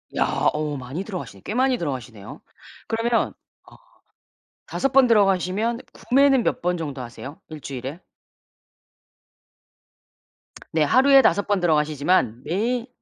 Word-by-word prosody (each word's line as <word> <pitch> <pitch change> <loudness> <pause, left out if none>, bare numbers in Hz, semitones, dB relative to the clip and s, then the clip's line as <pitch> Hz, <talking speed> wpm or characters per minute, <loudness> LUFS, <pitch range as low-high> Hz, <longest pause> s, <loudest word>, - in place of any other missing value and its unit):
야. - - +2 0.3
어 150 -1 -3
많이 135 +9 -6
들어가시네. 195 -4 -8
꽤 210 - -5
많이 255 0 +2
들어가시네요. 125 -9 -6 0.5
그러면 230 +1 0 0.4
어 - - -17 0.9
5 270 - -1
번 265 -1 +5
들어가시면 205 +2 +2
구매는 270 -1 +3
몇 - - -1
번 180 +1 0
정도 145 -5 -5
하세요? 125 +4 -9
1 155 -2 -10
주일에? 135 +4 -6 2.7
네. 160 -1 +2
하루에 270 - +6
5 200 - +2
번 205 -2 +1
들어가시지만 150 -5 +1
매일 230 +7 -1
180 Hz, 250 characters per minute, -23 LUFS, 145-235 Hz, 2.7 s, 하루에